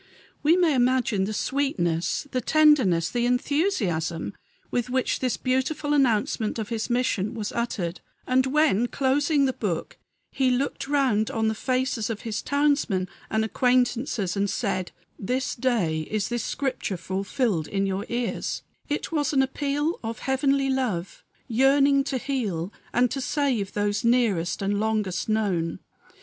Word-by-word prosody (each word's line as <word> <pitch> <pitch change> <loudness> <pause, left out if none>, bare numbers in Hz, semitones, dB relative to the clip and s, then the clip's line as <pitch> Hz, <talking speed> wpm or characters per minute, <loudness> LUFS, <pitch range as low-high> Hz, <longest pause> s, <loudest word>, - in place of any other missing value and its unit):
We 320 +4 +4
may 345 -4 +3
imagine 245 -6 +2
the 210 - -3
sweetness, 210 - -1
the 255 - 0
tenderness, 260 - +4
the 240 0 +1
enthusiasm 245 - 0 0.4
with 245 0 -1
which 260 0 0
this 255 -2 0
beautiful 265 +3 0
announcement 225 -5 +1
of 220 -2 -4
his 225 -1 -2
mission 240 -3 0
was 215 -2 -3
uttered; 190 -7 -3 0.2
and 260 +1 +2
when, 265 -5 +3
closing 280 +3 +2
the 260 - +1
book, 185 -9 -3 0.3
he 265 -1 +2
looked 260 +2 -1
round 260 -7 +2
on 220 -1 0
the - - 0
faces 255 -1 -1
of 220 -2 -4
his 220 -2 -3
townsmen 280 -10 +1 0.2
and 220 0 +1
acquaintances, 245 -5 +1
and 200 0 0
said, 185 -5 -2 0.3
"This 255 +7 -1
day 225 -11 0
is 210 -1 -1
this 240 -1 -2
scripture 260 -8 -2
fulfilled 190 - -1
in 195 0 -1
your 195 +2 -2
ears," 240 0 -2 0.3
it 295 - -2
was 300 -2 0
an 270 -1 +4
appeal 290 +4 -1
of 225 0 -4
Heavenly 270 0 +1
love 215 -10 -2 0.2
yearning 275 +3 +4
to 270 - -1
heal 215 - -2 0.2
and 245 0 +2
to 270 - -2
save 255 -8 0
those 205 +1 0
nearest 215 -8 +2
and 200 +1 0
longest 215 -3 -1
known. 190 -7 0
240 Hz, 145 wpm, -25 LUFS, 205-270 Hz, 0.4 s, We